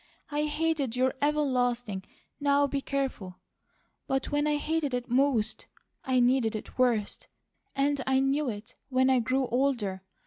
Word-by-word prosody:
I 295 Hz, +1 st, 0 dB
hated 300 Hz, -5 st, -1 dB
your 260 Hz, +1 st, +2 dB
everlasting: 245 Hz, -8 st, 0 dB, 0.4 s
'Now 285 Hz, 0 st, +3 dB
be 280 Hz, 0 st, -2 dB
careful,' 260 Hz, -11 st, -3 dB, 0.7 s
but 270 Hz, 0 st, -1 dB
when 290 Hz, +1 st, +1 dB
I 300 Hz, 0 st, +2 dB
hated 300 Hz, -3 st, -1 dB
it 245 Hz, 0 st, -3 dB
most, 255 Hz, -4 st, +1 dB, 0.4 s
I 260 Hz, -2 st, +2 dB
needed 245 Hz, -2 st, +2 dB
it 215 Hz, -, -7 dB
worst; 235 Hz, -5 st, +1 dB, 0.5 s
and 280 Hz, 0 st, +1 dB
I 265 Hz, 0 st, +3 dB
knew 270 Hz, +1 st, +1 dB
it, 220 Hz, +3 st, -7 dB, 0.2 s
when 260 Hz, 0 st, +3 dB
I 260 Hz, -, +4 dB
grew 255 Hz, +3 st, +1 dB
older. 235 Hz, -7 st, 0 dB
265 Hz, 145 wpm, -28 LUFS, 245-285 Hz, 0.7 s, I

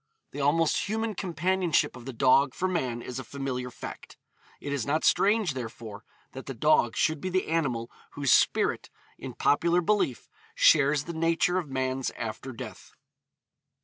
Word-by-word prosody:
The 145 Hz, -, -5 dB
almost 160 Hz, +6 st, +1 dB
human 220 Hz, 0 st, -1 dB
companionship 180 Hz, -3 st, 0 dB
of 125 Hz, -1 st, -11 dB
the 135 Hz, -, -5 dB
dog 130 Hz, +2 st, +3 dB
for 185 Hz, -, 0 dB
man 130 Hz, -10 st, -2 dB
is 125 Hz, +1 st, -6 dB
a -, -, -5 dB
familiar 130 Hz, -2 st, -4 dB
fact. -, -, -10 dB, 0.4 s
It 145 Hz, -, -4 dB
is 140 Hz, -5 st, -1 dB
not 155 Hz, +5 st, 0 dB
strange, 205 Hz, -5 st, +3 dB
therefore, 115 Hz, -4 st, -8 dB, 0.3 s
that 130 Hz, -, -9 dB
the 135 Hz, -, -5 dB
dog 120 Hz, -3 st, +3 dB
should 155 Hz, -2 st, +1 dB
be 185 Hz, -, -3 dB
the 185 Hz, 0 st, 0 dB
animal 135 Hz, -8 st, -1 dB, 0.2 s
whose 140 Hz, -5 st, +2 dB
spirit, -, -, +2 dB, 0.3 s
in -, -, -8 dB
popular 170 Hz, +4 st, +2 dB
belief, 180 Hz, -, 0 dB, 0.3 s
shares 145 Hz, -1 st, +4 dB
the 170 Hz, -, -6 dB
nature 165 Hz, +2 st, +1 dB
of 165 Hz, -6 st, -7 dB
man's 130 Hz, 0 st, -1 dB
after 115 Hz, +4 st, -5 dB
death. 115 Hz, -, -10 dB
145 Hz, 160 wpm, -27 LUFS, 130-170 Hz, 0.4 s, shares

